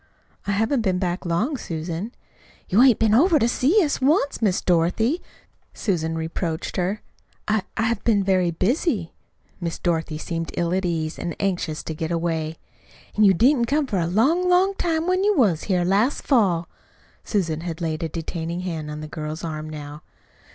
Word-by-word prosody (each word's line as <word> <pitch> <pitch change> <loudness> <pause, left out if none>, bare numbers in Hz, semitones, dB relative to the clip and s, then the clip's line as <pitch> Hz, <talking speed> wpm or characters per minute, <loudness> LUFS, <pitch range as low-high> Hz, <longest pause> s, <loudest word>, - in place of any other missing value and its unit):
"I - - +1
haven't 225 +5 +1
been 190 -4 +1
back 180 0 -2
long, 220 - 0
Susan." 170 +2 -4 0.6
"You 205 +6 +4
hain't 255 -4 +6
been 220 -1 +2
over 320 - +5
to 230 - +2
see 305 - +3
us 295 -3 -1
once, 285 0 +2
Miss 195 -5 +2
Dorothy," 185 - +1 0.5
Susan 165 -5 -1
reproached 160 0 -3
her. 190 +4 -1 0.4
"I 215 0 +2 0.2
I 225 - +1
have 225 -2 0
been 210 -4 +3
very 185 -2 +2
busy." 200 - 0 0.5
Miss 170 -2 -3
Dorothy 160 -3 -1
seemed 165 +1 -4
ill 170 0 0
at 190 0 0
ease, 160 -2 -2
and 170 - -4
anxious 180 -5 -1
to 160 - -4
get 160 +1 -4
away. 165 -2 -2 0.6
"An' 215 - +5
you 190 -1 +6
didn't 245 - +4
come 285 +5 +1
for 205 -8 -1
a 165 - 0
long, 290 - +2
long 370 +2 +4
time 330 -4 -1
when 370 +1 +1
you 415 -1 +2
was 195 - +2
here 180 -3 +1
last 205 +9 +1
fall." 185 - +2 0.6
Susan 165 -7 -1
had 165 -1 -5
laid 160 -1 -2
a 165 - -2
detaining 165 +2 -4
hand 160 -4 -4
on 150 0 -6
the 155 - -6
girl's 155 +1 -6
arm 155 -1 -5
now. 150 0 -8
185 Hz, 180 wpm, -23 LUFS, 165-235 Hz, 0.6 s, hain't